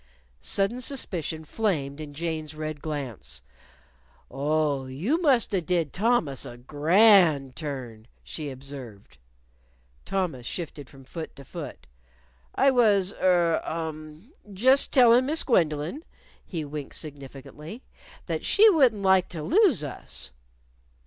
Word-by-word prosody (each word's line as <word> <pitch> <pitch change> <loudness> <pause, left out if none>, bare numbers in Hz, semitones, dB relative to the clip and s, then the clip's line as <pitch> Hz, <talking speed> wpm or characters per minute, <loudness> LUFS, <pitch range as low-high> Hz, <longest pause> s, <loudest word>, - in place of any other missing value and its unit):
Sudden 200 - 0
suspicion 170 - -3
flamed 155 -8 -2
in 145 -2 -9
Jane's 160 -1 -4
red 155 -1 -5
glance. 125 - -6 0.9
"Oh, 145 0 0
you 190 - -1
must've 235 - +2
did 170 -5 0
Thomas 190 - +1
a 120 - -9
grand 155 - +4
turn," 125 -7 -7 0.2
she 150 -3 -6
observed. 130 - -10 0.8
Thomas 165 -11 -3
shifted 150 -5 -6
from 135 -1 -15
foot 160 +4 -8
to 140 - -12
foot. 155 -5 -8 0.7
"I 275 0 +4
was 205 -6 +3
er 175 -3 +3
um 160 - -6 0.2
just 260 +8 +3
tellin' 250 0 +5
Miss 315 +3 +2
Gwendolyn" 165 - 0 0.4
he 165 -5 -5
winked 145 -1 -7
significantly 150 - -8 0.4
"that - - -3
she 430 +2 +5
wouldn't 250 - +3
like 190 -1 +4
to 160 -4 -6
lose 330 - +3
us." 135 - -7
160 Hz, 115 wpm, -26 LUFS, 140-205 Hz, 0.9 s, tellin